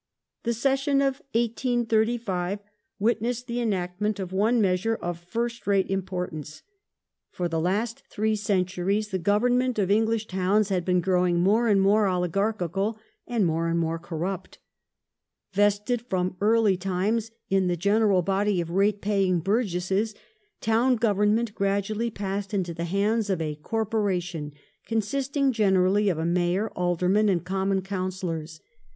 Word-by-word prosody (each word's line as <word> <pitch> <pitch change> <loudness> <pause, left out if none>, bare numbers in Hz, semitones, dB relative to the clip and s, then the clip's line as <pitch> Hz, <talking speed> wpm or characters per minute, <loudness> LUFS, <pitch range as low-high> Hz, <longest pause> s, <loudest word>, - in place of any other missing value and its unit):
Municipal 235 -1 -1
The 270 - +2
session 275 0 +1
of 275 0 0
1835 230 -5 0 0.4
witnessed 235 +3 0
the 240 0 -3
enactment 200 -1 -1
of 185 -1 -5
one 220 +5 +2
measure 200 +3 +1
Corpora 175 - -3
^^ - - -27
first 235 +4 -3
rate 195 -1 +2
importance. 180 -6 -4 0.7
For 180 - -3
the 165 -1 -1
last 205 +7 -1
three 220 +1 0
centuries 200 0 0
the 190 -2 -2
govern 215 +7 +2
ment 255 -2 -1
of 200 -2 +1
English 225 +1 +2
towns 190 +2 +1
had 185 -3 0
been 180 -1 +2
growing 180 -1 +2
more 210 +6 +3
and 205 -3 +4
more 205 +2 +4
oligar 185 +3 +1
chical, 195 +5 -2 0.3
and 230 -5 +1
more 165 0 0
and 165 0 0
more 165 0 -1
corrupt 175 +3 -5 1.0
Vested, 205 +4 +2
from 185 -5 -2
early 215 -2 +3
times, 195 +5 -1 0.2
in 190 -1 +3
the 175 -1 0
general 200 0 +3
body 195 +1 +1
of 170 -1 -3
rate 200 +2 +2
paying 195 -3 +1
burgesses, 195 +1 0 0.5
town 235 +3 +3
government 215 0 +1
gradually 200 +4 -1
passed 200 -1 -4
into 180 -3 -1
the 170 +1 -4
hands 205 +4 0
of 190 -3 0
a 155 -2 -2
"Corporation" 180 -4 -2 0.4
consisting 270 +5 0
generally 200 -2 +3
of 175 - 0
a 160 - -2
Mayor, 175 +4 +1
Aldermen, 180 +4 +2
and 175 -2 0
Common 190 +1 0
Councillors. 185 -4 -4
200 Hz, 145 wpm, -26 LUFS, 180-220 Hz, 1.0 s, and